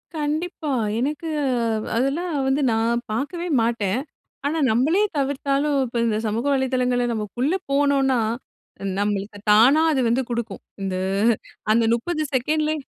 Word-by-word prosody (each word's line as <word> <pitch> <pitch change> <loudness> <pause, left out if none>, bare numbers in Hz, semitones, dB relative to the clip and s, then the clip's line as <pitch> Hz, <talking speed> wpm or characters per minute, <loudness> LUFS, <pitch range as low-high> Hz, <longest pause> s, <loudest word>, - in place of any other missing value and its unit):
கண்டிப்பா! 310 +2 -2 0.3
எனக்கு 295 +6 -2 0.2
அ - - +1 0.5
அதெல்லாம் 290 +8 0
வந்து 270 +2 +1
நான் 230 +2 +1
பாக்கவே 335 +10 -3
மாட்டேன். 225 0 0 0.4
ஆனா, 310 +3 0
நம்மளே 300 - +2 0.2
தவிர்த்தாலும் 280 +1 0
இப்ப 240 0 -5
இந்த 215 -1 +1
சமூக 225 +5 -2
வலைத்தளங்கள்ல 255 -2 +1
நம்ம 215 -2 -2 0.2
உள்ள 290 +7 +2 0.2
போனோன்னா, 275 -2 +3 0.8
நம்மளுக்கு 205 0 -2
தானா 255 +9 +6
அது 270 -4 +1
வந்து 250 +3 +2
குடுக்கும், 235 -4 -4 0.2
இந்த 190 -1 -2 0.8
அந்த 230 - +3
30 310 +6 -2
செகண்ட்லயே 305 +4 +1
265 Hz, 125 wpm, -23 LUFS, 230-295 Hz, 0.8 s, தானா